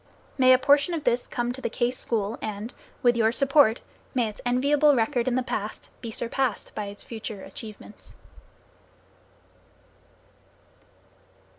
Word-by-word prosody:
May 255 -1 +5
a 255 - +8
portion 285 +5 +3
of 310 - -4
this 245 -1 +1
come 240 0 -2
to 265 - -7
the - - -1
Case 245 0 -1
School 220 -1 -2
and, 215 +2 -5 0.3
with 240 -1 +5
your 225 -1 +3
support, 275 -2 +4 0.3
may 240 -4 +2
its 210 - -11
enviable 285 +4 +4
record, 235 +1 +1
in 250 - +1
the 255 - +1
past, 215 -4 -5
be 230 - -5
surpassed 235 +1 -2
by 210 - -4
its 200 0 -7
future 220 -3 -7
achievements. 215 -1 -10
240 Hz, 140 wpm, -26 LUFS, 220-260 Hz, 0.3 s, a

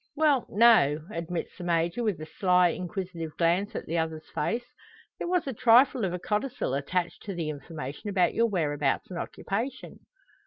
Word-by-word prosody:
"Well, 295 -4 +3
no;" 200 -10 +5
admits 170 0 -4
the - - -6
Major, 170 +5 0
with 210 -8 0
a 155 - -6
sly, 180 +1 +3
inquisitive 175 -3 -5
glance 180 +6 +1
at - - -4
the 165 +1 -1
other's 160 -1 -3
face. 240 +1 -1 0.5
"There - - -3
was 360 -1 +1
a 270 - -3
trifle 245 +2 +5
of 180 - -1
a 180 - -2
codicil 210 - -2
added 175 +5 -1
to 200 -3 -6
the 160 -3 -2
information 150 +3 -7
about 185 -3 +2
your 230 0 +3
whereabouts 150 -7 -1
and 175 - -4
occupation." 235 +7 -4
180 Hz, 170 wpm, -28 LUFS, 165-225 Hz, 0.5 s, no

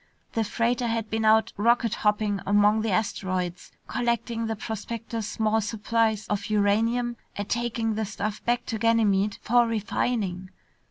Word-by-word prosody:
The 225 - +1
freighter 235 +3 0
had 225 -1 -2
been 220 0 0
out 220 0 +4
rocket 230 +1 +3
hopping 210 -2 +1
among 205 +2 +4
the 225 - -1
asteroids, 185 -3 -2 0.2
collecting 235 -1 -1
the 225 - -2
prospectors' 225 +1 -5
small 220 0 +1
supplies 220 0 0
of 205 -1 -2
uranium 225 +4 +1 0.2
and 205 0 -4
taking 235 -1 -1
the 220 +1 -1
stuff 210 +1 -4
back 240 +1 0
to 220 - -3
Ganymede 210 -3 +2
for 240 +1 +4
refining. 210 -4 -1
220 Hz, 145 wpm, -26 LUFS, 205-230 Hz, 0.2 s, out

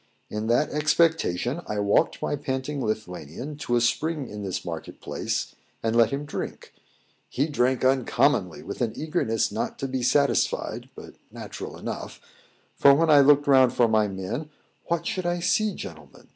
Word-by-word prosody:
In 105 +1 -3
that 120 +6 +2
expectation 150 - +1
I 105 - -3
walked 100 0 +1
my - - 0
panting 135 0 -3
Lithuanian 110 - -5
to 120 -4 -1
a 120 - +3
spring 145 +4 0
in 105 -1 -7
this 95 -3 -4
market 80 -2 -6
place, - - -3 0.3
and 115 0 0
let 115 -2 +5
him 140 +1 -3
drink. 145 - -6 0.6
He 140 - 0
drank 130 -4 +1
uncommonly, 130 -1 +2
with - - -7
an 115 -3 0
eagerness 150 - 0
not 105 - -3
to 135 - -3
be 130 -1 -2
satisfied, 125 -3 +1
but - - -11 0.2
natural - - -8
enough; - - -6 0.6
for 140 0 +6
when 160 +2 +3
I 145 - +8
looked 145 +1 +5
round 130 -3 +5
for 120 - +4
my 110 -1 +3
men, 100 +10 -5 0.4
what 170 0 -1
should 185 -1 -2
I 175 0 0
see, 205 +3 +1
gentlemen! 75 -5 -10
130 Hz, 165 wpm, -25 LUFS, 110-150 Hz, 0.6 s, I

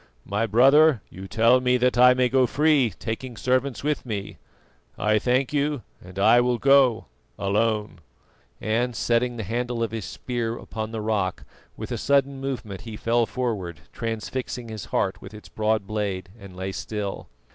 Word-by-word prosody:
My 105 +3 -1
brother, 135 +5 +5
you 95 +1 -9
tell 115 +5 +4
me 125 0 +3
that 125 0 +2
I 125 +1 +7
may 125 0 +3
go 130 0 +3
free, 150 -4 +3
taking 115 +3 -6
servants 130 +1 0
with 150 0 -1
me. 105 -5 -5 0.6
I 105 0 +2
thank 130 +5 +1
you 145 -2 0 0.2
and 90 +1 -12
I 110 +5 +5
will 125 0 +1
go 135 -3 +4 0.3
alone." 105 0 0 0.6
And 120 +3 -1
setting 120 +2 0
the 110 - -3
handle 120 +3 -2
of 115 - -2
his 110 -3 -4
spear 120 -2 -3
upon 110 -1 -6
the 110 -1 -4
rock, 105 -4 -1 0.3
with - - -6
a - - -2
sudden 140 -1 +1
movement 120 -8 -5
he 110 -1 -8
fell 115 +1 +1
forward, 100 -10 -3
transfixing 115 +2 -4
his 110 -1 -6
heart 95 - -1
with 100 +2 -10
its 105 - -12
broad 110 -1 0
blade, 100 -3 -3
and 100 -2 -12
lay 95 +1 -4
still. 105 0 -5
115 Hz, 170 wpm, -24 LUFS, 105-125 Hz, 0.6 s, I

